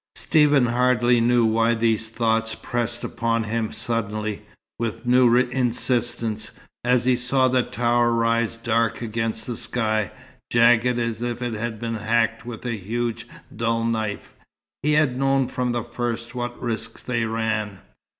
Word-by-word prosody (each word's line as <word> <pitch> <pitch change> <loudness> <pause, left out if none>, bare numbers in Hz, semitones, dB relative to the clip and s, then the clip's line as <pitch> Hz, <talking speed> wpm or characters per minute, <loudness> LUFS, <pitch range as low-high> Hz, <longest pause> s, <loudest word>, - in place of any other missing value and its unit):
Stephen 145 -4 +4
hardly 120 0 +3
knew 120 0 +3
why 115 +1 +2
these 110 -1 0
thoughts 115 -1 0
pressed 120 0 -3
upon 115 0 -1
him 110 0 -2
suddenly, 110 -2 -3 0.4
with 115 +1 -3
new 125 -1 +5
insistence, 120 -2 0 0.3
as 125 0 +2
he 130 -1 +4
saw 130 +1 +2
the 130 0 +3
tower 120 0 +1
rise 115 0 +1
dark 115 0 0
against 115 0 -2
the 120 - -4
sky, 110 -4 -1 0.4
jagged 120 +1 +4
as 115 -1 -2
if 120 -1 -2
it 120 -2 -2
had 110 0 -4
been 115 0 -3
hacked 115 +1 0
with 120 0 -7
a 125 - -1
huge, 115 +4 -3 0.3
dull 115 +1 0
knife. 110 -3 -2 0.5
He 150 +1 +2
had 150 -4 +2
known 135 -1 +2
from 125 -1 -2
the 120 -1 -1
first 120 0 -4
what 120 -1 -4
risks 115 -3 -4
they 120 -2 -1
ran. 110 -3 -2
115 Hz, 150 wpm, -23 LUFS, 115-120 Hz, 0.5 s, new